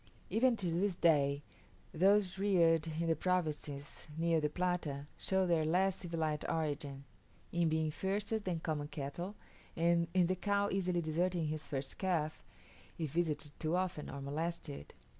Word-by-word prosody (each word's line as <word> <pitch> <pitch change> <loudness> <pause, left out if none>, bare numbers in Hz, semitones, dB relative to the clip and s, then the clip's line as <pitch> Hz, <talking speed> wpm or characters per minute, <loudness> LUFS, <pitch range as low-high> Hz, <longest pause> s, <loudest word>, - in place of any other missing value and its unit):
Even 240 +1 +4
to 180 -5 -1
this 185 +3 +1
day, 145 -4 +3 0.5
those 190 +2 +3
reared 170 -5 +4
in 160 +1 -2
the 165 -1 +3
provinces 150 -5 -2
near 165 -1 +2
the 150 - +1
Plata 170 -5 -1
show 190 -1 +1
their 170 -3 +3
less 185 +4 +2
civilized 160 -4 -2
origin, 145 -3 -2 0.5
in 170 -1 +2
being 155 0 +1
fiercer 200 +6 -1
than 185 -5 -2
common 150 -2 -2
cattle, 155 +8 -5 0.4
and 170 0 +3
in 180 -2 +5
the 185 +2 +1
cow 200 +1 +1
easily 180 -2 +1
deserting 170 +1 0
her 155 - -1
first 140 -3 -5
calf, 165 -5 0 0.5
if 155 -4 -2
visited 150 -2 0
too 160 +2 0
often 180 -4 -1
or 140 - -6
molested. 145 - -4
165 Hz, 150 wpm, -35 LUFS, 155-185 Hz, 0.5 s, in